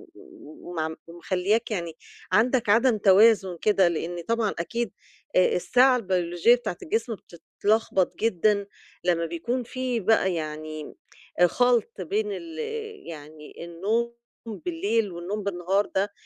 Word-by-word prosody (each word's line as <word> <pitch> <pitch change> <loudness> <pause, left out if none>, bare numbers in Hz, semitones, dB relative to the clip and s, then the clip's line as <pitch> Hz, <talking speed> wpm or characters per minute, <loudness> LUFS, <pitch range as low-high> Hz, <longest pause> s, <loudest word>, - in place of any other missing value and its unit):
وم 175 - -7
ومخلّياك 185 +7 -1
يعني 170 -5 -3 0.4
عندك 235 +3 +2
عدم 230 +2 +4
توازن 195 -2 +5
كده، 195 -4 +4
لإن 170 +1 -3
طبعًا 230 -2 +1
أكيد 230 +4 -2 0.4
آآ 185 - +4
الساعة 255 +7 +4
البيلوجية 185 +1 +2
بتاعة 215 -8 -5
الجسم 225 +6 -1
بتتلخبط 195 +2 -1
جدًا 205 -1 +2 0.4
لمّا 170 -2 +1
بيكون 205 +10 -3
في 250 0 -2
بقى 190 -3 +2
يعني 155 -1 -6 0.5
خَلْط 235 0 +1
بين 210 +5 -1
ال 165 -4 -7 0.5
يعني 155 +1 -10
النوم 215 +8 -1 0.3
بالليل 230 - -1
والنوم 185 +5 -5
بالنهار 195 +1 0
ده، 200 +1 -1
200 Hz, 115 wpm, -26 LUFS, 170-230 Hz, 0.5 s, توازن